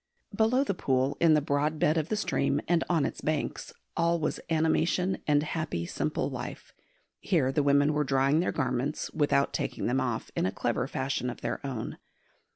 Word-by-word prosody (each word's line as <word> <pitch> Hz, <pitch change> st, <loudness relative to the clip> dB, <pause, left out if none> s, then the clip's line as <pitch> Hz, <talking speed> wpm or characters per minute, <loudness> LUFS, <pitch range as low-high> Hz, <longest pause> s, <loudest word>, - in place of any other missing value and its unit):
Below 235 Hz, +4 st, +3 dB
the 230 Hz, -, -1 dB
pool, 135 Hz, -4 st, 0 dB
in 165 Hz, -2 st, +6 dB
the 150 Hz, -, +3 dB
broad 150 Hz, +2 st, 0 dB
bed 150 Hz, +1 st, +2 dB
of 160 Hz, -1 st, -1 dB
the 215 Hz, -, +1 dB
stream 145 Hz, -8 st, 0 dB
and 170 Hz, -1 st, +2 dB
on 165 Hz, -5 st, +2 dB
its -, -, -4 dB
banks, 155 Hz, -1 st, -2 dB, 0.2 s
all 170 Hz, 0 st, +2 dB
was 155 Hz, -, -1 dB
animation 165 Hz, +3 st, +1 dB
and 145 Hz, -1 st, +3 dB
happy 155 Hz, -, -3 dB
simple -, -, -2 dB
life. -, -, -7 dB, 0.5 s
Here 145 Hz, -8 st, +1 dB
the 145 Hz, -, +1 dB
women 145 Hz, +1 st, +3 dB
were 150 Hz, 0 st, +1 dB
drying 135 Hz, +2 st, +2 dB
their 175 Hz, -, +1 dB
garments, 130 Hz, +1 st, -2 dB
without 145 Hz, -2 st, +2 dB
taking -, -, -2 dB
them 130 Hz, +2 st, +1 dB
off, 120 Hz, -4 st, -3 dB
in -, -, +1 dB
a -, -, -1 dB
clever 120 Hz, +4 st, -1 dB
fashion 135 Hz, -2 st, -2 dB
of -, -, -7 dB
their 120 Hz, -, -3 dB
own. 130 Hz, -5 st, -5 dB
145 Hz, 185 wpm, -29 LUFS, 135-160 Hz, 0.5 s, in